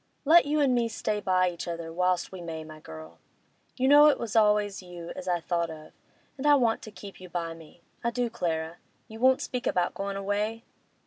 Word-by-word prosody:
Let 320 +1 +6
you 300 +1 +1
an' 270 -3 +3
me 240 -1 +2
stay 215 -1 -2
by 185 -2 +2
each 170 - -7
other 165 -1 -5
whilst 180 0 0
we 190 -2 -8
may, 160 -2 -6
my 155 0 -11
girl. 80 - -11 0.6
You 260 - +2
know 290 +2 +8
it 295 - +4
was 230 -2 -5
always 210 -2 +3
you 175 -2 -9
as 185 - -8
I 175 -1 +1
thought 170 0 -1
most 155 -1 -10
of, - - -28 0.5
and 290 - -1
I 290 - +7
want 235 -5 +2
to 215 - -10
keep 200 -2 -11
you 185 - -10
by 170 -2 -3
me—I 165 +7 -8
do, 245 +1 -1
Clara. 165 -5 -3 0.3
You 220 0 -10
won't 260 +1 +4
speak 250 -1 -4
about 175 -1 +1
goin' 200 0 -4
away? 205 +3 -2
195 Hz, 215 wpm, -28 LUFS, 170-230 Hz, 0.6 s, know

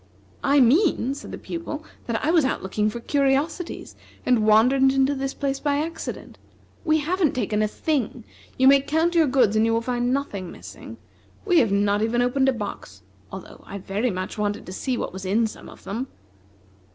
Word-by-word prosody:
"I 280 +1 +4
mean," 270 - +3
said 285 - -9
the - - -6
Pupil, 315 -2 -6 0.2
"that 230 +1 -2
I 315 - +3
was 335 -3 +4
out 265 - -1
looking 210 +3 0
for 235 - -6
curiosities, 285 +6 -1 0.3
and 230 -4 +3
wandered 230 +5 +5
into 270 +1 +4
this 270 0 -3
place 275 -1 -2
by 285 -1 0
accident. 325 +3 -5 0.4
We 315 -2 +3
haven't 340 0 +1
taken 215 -3 0
a 215 - +2
thing. 255 -1 -2 0.3
You 260 - +4
may 275 0 +7
count 320 +5 +1
your 330 -3 +4
goods, 255 -6 +3
and 215 - +3
you 225 0 +2
will 230 - +1
find 245 +1 -1
nothing 210 -10 -3
missing. - - -11 0.5
We 360 -5 +4
have 225 -5 +2
not 200 +1 +2
even 235 +2 +1
opened 265 +2 +2
a - - +2
box, 100 - -7 0.3
although 190 -1 -10
I 200 - -6
very 200 +5 -2
much 185 +2 -5
wanted 205 0 -2
to 185 - -8
see 255 +5 -2
what - - -4
was 190 0 -7
in 210 +5 +2
some 220 - -8
of - - -15
them." 235 +7 -4
255 Hz, 195 wpm, -24 LUFS, 215-285 Hz, 0.5 s, may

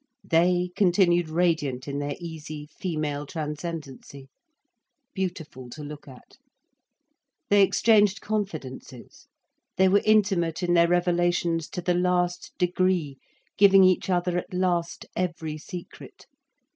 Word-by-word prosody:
They 175 +2 +2
continued 175 -3 +3
radiant 155 -6 0
in 140 0 -3
their 145 0 -3
easy 155 -3 -8
female 150 -5 -3
transcendancy, 150 -3 -7 0.8
beautiful 160 -9 -5
to 150 +5 -9
look 145 0 -9
at. 130 -2 -16 1.1
They 205 0 +6
exchanged 210 +1 +4
confidences, 155 - -6 0.5
they 190 - +5
were 200 +2 +4
intimate 195 -6 +2
in 175 0 +1
their 170 -1 +5
revelations 175 -1 +1
to 180 - -6
the 180 - +1
last 180 0 0
degree, 180 -5 0 0.4
giving 195 -1 +7
each 185 0 +3
other 180 -1 +1
at - - -10
last 175 -2 -1
every 165 -4 -3
secret. 175 +3 -10
175 Hz, 115 wpm, -25 LUFS, 155-180 Hz, 1.1 s, giving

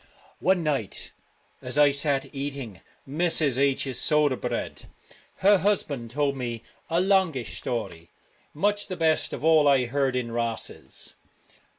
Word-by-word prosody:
One 185 -2 +2
night 140 -10 -2 0.5
as 125 +3 -2
I 145 -1 +6
sat 140 -1 0
eating 135 -7 -5 0.3
Mrs. 150 -3 +1
H 140 0 +2
's 130 -3 -2
soda 150 -3 +3
bread, - - -4 0.6
her 200 -1 +7
husband 150 - 0
told 140 +2 0
me 120 -3 -4 0.3
a 165 +1 +2
longish 180 - +1
story, 85 -9 -4 0.4
much 205 +5 0
the 185 -2 -5
best 160 -1 +2
of - - -6
all 160 -2 +5
I 135 -3 +4
heard 135 +1 0
in 120 -2 -2
Rosses. 115 -1 -3
140 Hz, 140 wpm, -26 LUFS, 125-160 Hz, 0.6 s, her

